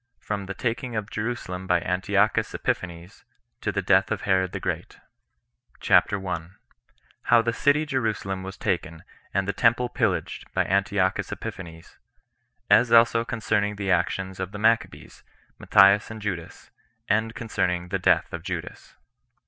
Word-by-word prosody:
From 100 -2 -4
The 100 - -5
Taking 120 +2 -3
Of 110 0 -4
Jerusalem 105 -5 -4
By 90 -1 +3
Antiochus 100 +4 +1
Epiphanes, 85 0 -4 0.4
To - - -1
The - - -2
Death - - +3
Of - - -1
Herod 95 -1 +1
The - - -4
Great. - - -4 0.8
CHAPTER 100 - +3
1. 90 -2 -5 0.7
How 120 -1 +5
The 115 0 0
City 145 +5 +2
Jerusalem 110 -9 -2
Was 95 +1 -8
Taken, 85 -2 -3 0.3
And 95 0 -1
The 100 - 0
Temple 120 +1 +2
Pillaged - - -2
[By - - +2
Antiochus 100 0 0
Epiphanes]. 85 -7 -8 0.7
As 115 +4 +5
Also 115 0 +5
Concerning 105 -3 -1
The 100 -2 -2
Actions 95 0 -1
Of 95 +2 -4
The - - -5
Maccabees, 115 +2 0 0.4
Matthias 100 +1 +5
And 110 0 -7
Judas; 90 -6 -6 0.4
And 110 +2 0
Concerning 90 -6 -2
The 95 - -1
Death 90 - +2
Of - - -4
Judas. - - -7
100 Hz, 145 wpm, -25 LUFS, 95-115 Hz, 0.8 s, How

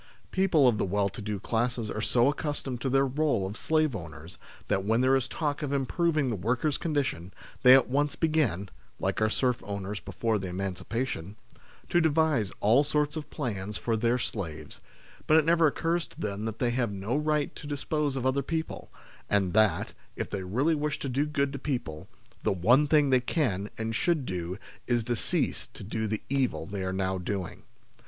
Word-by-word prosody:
People 185 -8 +4
of 110 -4 +3
the - - +2
well 100 +1 +1
to 105 - -8
do 105 -1 -3
classes 115 +1 -1
are 110 - -3
so 120 +2 +3
ac 145 - -2
customed 140 -5 -3
to 135 - 0
their 135 +1 +3
role 135 -6 +1
of 95 +2 -5
slave 155 -1 +1
owners 80 -2 -9 0.3
that 95 - +1
when 110 +4 +2
there 130 +1 +4
is 135 -1 0
talk 145 +1 -2
of 145 -2 -2
improving 145 +1 +1
the - - -1
workers' 120 - 0
condition, 135 - -1 0.3
they 125 +1 +9
at 135 - +4
once 145 +3 +1
begin 145 - +1 0.3
(like - - -1
our 110 - +3
serf 125 +2 0
owners 100 0 -4
before 115 -2 -1
the 95 - -4
emancipation) 95 +2 -3 0.5
to 175 - +3
devise 155 - +2
all 115 +7 +5
sorts 150 +1 0
of 155 -2 -5
plans 105 -7 -3
for 115 - -1
their 115 +2 +2
slaves, 95 -10 -5 0.5
but 155 - +6
it 160 - +4
never 165 0 +5
occurs 165 +3 0
to - - -17
them 105 +1 -3
that 110 -1 -4
they 120 0 +1
have 120 -3 0
no 100 +5 -2
right 150 0 0
to 145 - -8
dispose 145 0 -1
of 130 -1 -2
other 130 +1 +2
people; 160 +3 -4 0.4
and 95 -3 +2
that, 105 -6 +3 0.2
if - - -4
they 100 - -2
really 125 - +1
wish 150 -1 -1
to 140 - -4
do 140 +4 0
good 140 -2 0
to 140 - -4
people, 120 - -4 0.3
the - - +1
one 120 - +4
thing 145 -2 +4
they 130 -1 +5
can 115 - 0
and 115 0 -2
should 155 +1 +1
do 90 -1 -4 0.3
is 120 -2 +2
to 120 +2 -1
cease - - -1
to - - -12
do 110 +2 -2
the 110 0 -3
evil 130 -10 0
they 100 +1 -4
are 95 - -1
now 95 0 -1
doing. 90 0 -4
125 Hz, 200 wpm, -28 LUFS, 100-145 Hz, 0.5 s, they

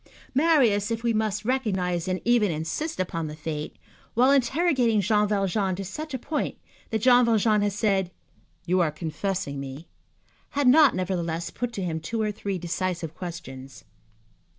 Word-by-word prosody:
Marius, 255 -9 +3
if 230 0 -3
we 235 -1 +2
must 215 -1 -1
recognize 190 -9 0
and 185 0 -1
even 235 -3 +4
insist 165 - -3
upon 165 -3 -2
the 150 - -7
fact, 150 -1 -5 0.4
while 255 +4 +5
interrogating 265 -4 +2
Jean 210 +1 +2
Valjean 195 -1 0
to 195 +1 -5
such 300 - -5
a - - -1
point 295 +5 -3 0.3
that 220 -2 -2
Jean 250 -1 +6
Valjean 220 -2 +3
had 205 0 +1
said: 195 -3 +1 0.6
"You 185 +2 +2
are 170 -3 +3
confessing 160 -1 -3
me," 140 +4 -8 0.7
had 285 -2 +3
not, 290 +2 +6
nevertheless, 170 -2 -2
put 245 0 -3
to 195 - -3
him 165 -3 -2
two 225 +9 -4
or 215 -1 0
three 200 -2 -4
decisive 175 -2 -3
questions. 135 -7 -8
200 Hz, 160 wpm, -26 LUFS, 170-235 Hz, 0.7 s, Jean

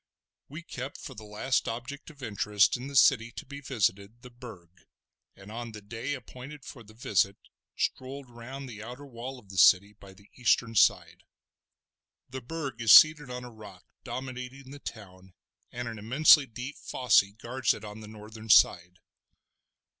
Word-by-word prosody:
We 155 +5 -9
kept 130 -3 -7
for - - -9
the 110 - -11
last 105 +5 -1
object 120 +7 -6
of 145 -3 -14
interest 105 -2 +2
in 125 +2 -6
the 140 - -8
city 120 -3 +5
to - - -8
be 140 +1 -9
visited 110 -3 -2
the 125 - -12
Burg, 95 -8 -14 0.5
and 95 +2 -13
on 115 0 -7
the 105 - -9
day 115 +7 -4
appointed 130 +3 -11
for 125 - -10
the 110 -1 -16
visit 100 -4 +1 0.4
strolled 135 +1 -3
round 125 +3 -9
the 110 -4 -9
outer 125 +6 -9
wall 130 0 -8
of 105 -6 -18
the 95 -1 -3
city 100 +3 +6
by 100 -2 -15
the 100 +2 -20
eastern 120 -1 +1
side. 110 - +2 1.0
The 130 +1 -7
Burg 135 -2 -6
is 115 -2 +4
seated 155 -3 +8
on 125 0 -6
a 125 - -10
rock 105 -5 -13 0.2
dominating 130 +1 -7
the 145 - -10
town 95 -7 -11 0.4
and 120 0 -5
an 115 -2 -6
immensely 140 +6 +5
deep 125 +5 -8
fosse 125 -3 +3 0.2
guards 120 +1 0
it 110 - -10
on 105 +1 -9
the 110 - -10
northern 110 +1 -11
side. 90 -2 +4
120 Hz, 170 wpm, -28 LUFS, 105-130 Hz, 1.0 s, seated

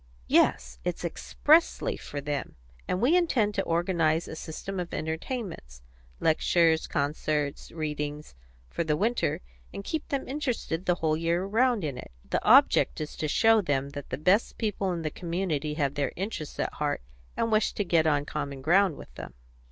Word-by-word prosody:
"Yes, - - +2
it's - - -3
expressly 335 +9 +2
for 145 - -6
them, 145 0 -4 0.3
and 180 - 0
we 265 - +4
intend 255 -12 +2
to 195 - 0
organise 170 -2 +1
a - - -6
system 180 +5 -6
of 175 -1 -4
entertainments 160 - -5 0.4
lectures, 160 0 +3
concerts, 145 0 -2
readings 150 -2 -4 0.3
for 170 - -2
the 150 -2 0
winter, 230 +6 0 0.3
and 200 - -7
keep 315 +8 -3
them 275 -4 -2
interested 250 - -3
the 180 - +4
whole 160 -3 +1
year 170 +2 0
round 230 +1 +2
in 140 -5 -3
it. - - -9 0.2
The - - -1
object - - +5
is 155 -1 -5
to 155 - -1
show 225 +7 +4
them 140 -5 -1
that 145 -1 -8
the 130 - -3
best 185 +9 +2
people 205 -4 -1
in 170 -2 -3
the 155 - -2
community 165 -4 -2
have 140 -3 0
their 145 -1 -1
interests 185 -5 -5
at - - -1
heart, 145 - -2 0.3
and 230 - 0
wish 215 0 +2
to 205 - -1
get 165 -2 +3
on 145 -2 +2
common 140 -2 -5
ground 180 +1 +4
with - - -12
them." - - -9
165 Hz, 175 wpm, -28 LUFS, 150-200 Hz, 0.4 s, object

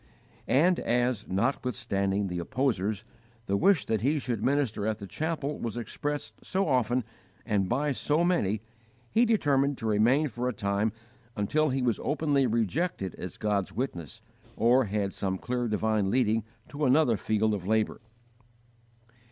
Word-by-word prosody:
And 175 +7 +4
as, 120 -2 0
notwithstanding 105 -2 0
the 90 -2 -3
opposers, 110 0 -1 0.4
the 100 - 0
wish 170 - +3
that 110 -3 0
he 145 +6 +2
should 125 -6 -3
minister 130 -7 +1
at 110 -1 0
the 100 - -8
chapel 150 - -3
was 115 -1 -4
expressed 145 +5 -4
so 195 0 0
often 125 -2 +2 0.4
and 100 -5 0
by 140 +4 +1
so 150 +4 +1
many, 110 - +1 0.5
he 235 +2 +4
determined 145 - +2
to 115 - -6
remain 115 +8 +3
for 125 0 -2
a - - -3
time 100 +1 0 0.4
until 150 +10 +1
he 130 0 0
was 120 -3 +1
openly 145 -2 +1
rejected 115 - -1
as 90 - -6
God's 100 -3 -1
witness, 95 - -4 0.3
or 120 +3 +4
had 100 -1 -2
some 95 -1 -2
clear 125 +3 -2
divine 110 -2 +1
leading 115 -2 +2 0.2
to 150 +1 -2
another 130 -2 +4
field 110 +2 +1
of 95 -3 -4
labour. 110 +1 +1
120 Hz, 150 wpm, -28 LUFS, 105-140 Hz, 0.5 s, And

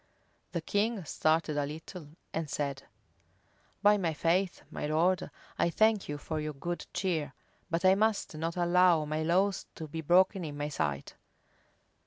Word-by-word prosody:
The 170 - -1
king 205 +2 0
started 155 0 +1
a 145 - 0
little, 160 +2 -8 0.3
and 160 -2 -2
said, 140 -1 -3 1.0
"By 205 0 +6
my 165 -4 -1
faith, 175 +4 +1
my - - -3
lord, 170 +5 +1 0.3
I - - +3
thank 215 +1 +2
you 145 - -3
for 155 +2 -4
your 150 0 -3
good 175 +5 -4
cheer, 165 -7 -2 0.3
but 170 +2 -1
I 185 - +7
must 215 -1 +1
not 165 +3 -3
allow 175 -2 +4
my 155 +1 -2
laws 185 +4 +1
to 160 - -6
be 160 +2 -5
broken 185 +4 +4
in 145 -2 -5
my 145 0 -2
sight. 70 - -2
165 Hz, 160 wpm, -30 LUFS, 155-185 Hz, 1.0 s, I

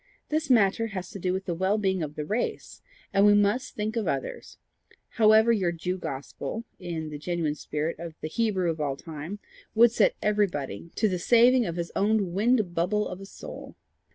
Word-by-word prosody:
This 310 -1 -1
matter 225 -2 +4
has 185 -4 -6
to 200 - -7
do 180 0 0
with 190 +1 -2
the 175 - -1
well 190 +5 +1
being 190 -3 0
of 150 -1 -4
the 150 - -4
race; 215 +8 -3 0.3
and 195 - +4
we 205 0 +7
MUST 205 +6 +1
think 215 +2 -2
of 225 -3 -1
others, - - -4 0.5
however 220 0 +5
your 190 -6 +2
Jew 180 +2 -3
gospel, 140 +10 -5 0.2
in 165 -4 -5
the 145 - -6
genuine 165 -1 -1
spirit 150 +2 -3
of 170 -1 -7
the - - -4
Hebrew 190 -2 0
of 160 -1 -5
all 140 -2 -1
time, 160 +5 -7 0.4
would 235 +1 +7
set 225 -3 +3
everybody 170 - -1
to 220 - +2
the 185 -3 -1
saving 240 +4 +5
of 170 - -3
his 170 -1 -4
own 205 -3 +1
wind 215 -2 +2
bubble 190 +5 0
of 180 +1 -7
a 195 - -9
soul. - - -10
190 Hz, 195 wpm, -27 LUFS, 170-220 Hz, 0.5 s, we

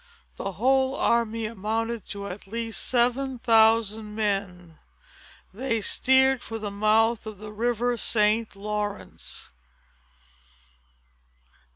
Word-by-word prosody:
The 195 - -4
whole 265 +5 +2
army 230 -1 +1
amounted 225 +1 -3
to 200 0 -6
at 195 +1 -8
least 230 +2 -3
seven 255 +2 +1
thousand 220 -2 +3
men. 195 -6 -3 0.7
They 230 +1 -1
steered 265 +4 +3
for 225 - -6
the 210 -2 -5
mouth 220 +2 +2
of 215 -2 -7
the 210 +1 -9
river 240 +2 0
St. 215 0 +1
Lawrence. 210 0 -5
220 Hz, 100 wpm, -26 LUFS, 210-235 Hz, 0.7 s, thousand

